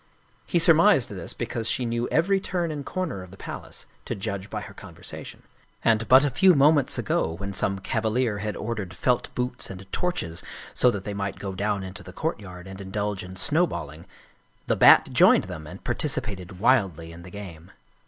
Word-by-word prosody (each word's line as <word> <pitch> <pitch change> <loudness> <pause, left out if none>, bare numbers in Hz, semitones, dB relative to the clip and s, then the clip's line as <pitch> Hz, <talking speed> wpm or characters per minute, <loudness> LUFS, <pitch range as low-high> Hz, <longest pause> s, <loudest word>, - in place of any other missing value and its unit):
He - - +1
surmised - - +5
this - - -6
because 115 -1 -3
she 125 - 0
knew 120 +1 -1
every 195 +5 +2
turn 175 -3 -2
and 145 -2 -5
corner 160 - -3
of 90 - -11
the 95 - -13
palace, - - -8 0.2
to - - -3
judge 100 0 -4
by 105 - -4
her 100 -1 -10
conversation. 100 -4 -9 0.4
And 115 0 +3
but 130 +2 +7
a 145 - 0
few 185 +3 +5
moments 145 0 +4
ago, 80 - 0
when 100 +3 -5
some 100 +1 0
cavalier 110 +2 0
had 105 0 -3
or 115 +2 -3
dered 95 -4 -5
felt 120 +8 0
boots 125 0 -3
and 95 0 -8
torches 130 - -2 0.3
so 125 - +4
that 100 -5 -3
they 105 - -4
might 100 -1 -3
go 95 -1 -5
down 100 +1 -1
into 95 +2 -8
the 90 -2 -11
courtyard 95 - -4
and 95 +1 -9
indulge 100 0 -3
in 90 +1 -9
snowballing, 85 - 0 0.6
the - - +1
Bat - - +7
joined - - +6
them 80 -1 -8
and - - -10
participated 95 -3 -2
wildly 95 - +2
in 85 +1 -11
the 90 - -11
game. 90 -4 -9
100 Hz, 190 wpm, -25 LUFS, 95-125 Hz, 0.6 s, but